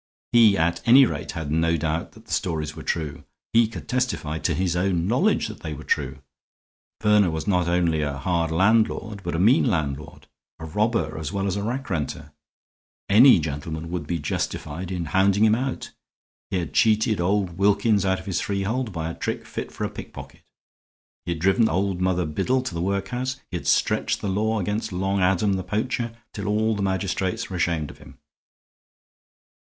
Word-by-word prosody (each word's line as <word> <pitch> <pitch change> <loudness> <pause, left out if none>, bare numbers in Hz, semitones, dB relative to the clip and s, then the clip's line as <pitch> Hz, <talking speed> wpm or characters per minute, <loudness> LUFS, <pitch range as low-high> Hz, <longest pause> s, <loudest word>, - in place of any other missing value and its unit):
He, 115 -4 +6
at 85 +1 +1
any 130 +3 +8
rate, 80 -6 -4
had 80 -3 -4
no 80 +1 +2
doubt 80 +1 -2
that - - -17
the - - -6
stories 80 -5 -2
were 80 - -8
true; 75 -4 -3 0.3
he 115 0 +5
could 115 - -9
testify, 120 -12 -1
to - - 0
his 90 -1 0
own 90 -2 +1
knowledge, 135 - +2
that 110 - -9
they 80 -2 -5
were - - -9
true. 70 -1 -2 0.8
Verner 105 -3 +4
was 80 -1 -3
not 90 -4 +1
only 85 -2 +1
a 70 -2 -2
hard 85 +1 0
landlord, 105 +3 +1
but 85 -2 -3
a - - -1
mean 115 - +5
landlord, 75 - -2 0.3
a 80 - -8
robber 110 +8 0
as 80 - -4
well 100 -1 -2
as 95 -1 -1
a 100 - -2
rackrenter; 100 - -3 0.8
any 120 +7 +8
gentleman 80 +2 -5
would 85 -5 -4
be 85 - -1
justified 80 +3 -4
in 90 -2 -2
hounding 95 +6 +3
him 110 - +4
out. 130 +3 -2 0.6
He 95 - -1
had 85 -6 -4
cheated 110 -2 +3
old 95 -1 0
Wilkins 100 +1 +3
out 95 -1 +1
of - - -12
his 95 -3 -1
freehold 105 +5 -2
by 80 -3 -3
a 85 - -4
trick - - -4
fit - - -6
for - - -6
a - - -1
pickpocket; - - -10 0.9
he 85 - +1
had 80 - -8
driven 95 +6 +3
old 95 +1 -1
Mother 90 -1 +1
Biddle 110 +12 0
to 130 - -5
the 85 - -3
workhouse; 120 +8 -2
he 90 - -2
had - - -7
stretched - - +2
the 100 - -3
law 110 +3 0
against 105 +3 -2
Long 95 +2 -1
Adam, 95 +2 +2
the 95 -1 -2
poacher, 115 +5 -2 0.2
till 100 - -5
all 110 +1 +1
the 105 - -3
magistrates 95 +3 -1
were - - -3
ashamed 85 -4 0
of - - -18
him. - - -15
95 Hz, 190 wpm, -24 LUFS, 80-105 Hz, 0.9 s, any